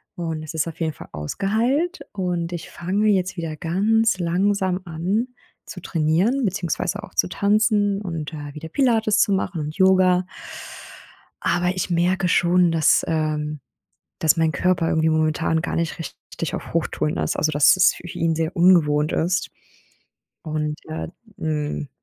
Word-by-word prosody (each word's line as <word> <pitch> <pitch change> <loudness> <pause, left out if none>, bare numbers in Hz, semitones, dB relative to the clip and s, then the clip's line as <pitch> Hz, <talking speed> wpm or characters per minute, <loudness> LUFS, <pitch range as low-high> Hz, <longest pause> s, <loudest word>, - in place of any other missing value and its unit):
und 165 -2 -4
es 155 - -7
ist 160 0 -1
auf 165 - -8
jeden 160 -1 0
Fall - - -11
ausgeheilt. 230 - -1
Und 180 -3 -2
ich 175 -2 -6
fange 195 +5 -1
jetzt 190 -2 +1
wieder 165 -2 -4
ganz 200 +6 +1
langsam 185 +2 0
an 180 +8 -1 0.4
zu 185 - -8
trainieren, 175 - +1
beziehungsweise 180 -4 -2
auch - - -11
zu 90 - +2
tanzen 205 - +2
und, 165 -5 -5
äh, 145 -2 -7
wieder 155 +2 -8
Pilates 225 - +2
zu - - +2
machen 190 -3 -1
und 150 +2 -6
Yoga 185 -1 +4 1.2
aber 175 +1 +1
ich 185 - -2
merke 180 +2 +1
schon, 175 0 +3
dass 160 -1 +3
ähm, 150 -2 -1 0.6
dass 160 -1 +3
mein 160 -1 +2
Körper 180 +1 +1
irgendwie 160 0 +2
momentan 160 +1 +1
gar - - -3
nicht 170 +1 -2
richtig 165 - -6
auf - - -8
Hochtouren 75 +1 -1
ist, 80 -1 -1
also, 155 - +1
dass 145 +5 +5
es 185 0 +5
für - - -10
ihn 165 -1 -1
sehr 160 +1 -2
ungewohnt 155 -4 +4
ist. 180 +3 0 1.0
Und, 150 -1 -2
ja, 155 - -4 0.3
hm, 150 -2 -3
170 Hz, 155 wpm, -22 LUFS, 155-190 Hz, 1.2 s, dass